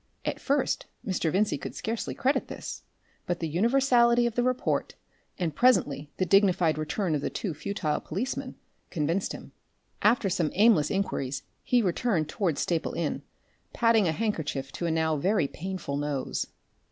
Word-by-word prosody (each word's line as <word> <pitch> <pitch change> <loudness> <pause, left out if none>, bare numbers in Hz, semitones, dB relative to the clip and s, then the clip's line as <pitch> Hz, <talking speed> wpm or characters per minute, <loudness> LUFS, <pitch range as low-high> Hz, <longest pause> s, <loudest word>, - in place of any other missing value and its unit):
At - - -2
first 280 +1 0 0.2
Mr. 175 -4 0
Vincey 205 +4 +1
could - - -6
scarcely 225 +1 -3
credit 270 +3 +1
this, - - -7 0.5
but 175 -1 -1
the 165 - -2
universality 235 - +4
of 235 - 0
the 245 - +1
report, 255 0 0 0.4
and 165 -5 -2
presently 150 - +3
the 185 - +1
dignified 180 -4 +3
return 165 +3 -1
of 145 -2 -2
two 190 -6 -2
futile 155 -1 -2
policemen, 260 - -4 0.3
convinced 165 +4 -1
him. - - -9 0.5
After 215 0 +4
some 175 -4 +1
aimless 200 -7 +5
inquiries 140 -9 -2 0.2
he 245 -2 +3
returned 180 -4 0
towards 170 -7 -1
Staple 170 -2 -1
Inn, - - -2 0.5
padding 230 -4 +4
a - - +2
handkerchief 155 -8 -2
to 170 - -3
a - - +1
now 160 -1 +1
very 185 0 +2
painful 180 -3 -4
nose. 145 -2 -2
185 Hz, 150 wpm, -28 LUFS, 155-225 Hz, 0.5 s, aimless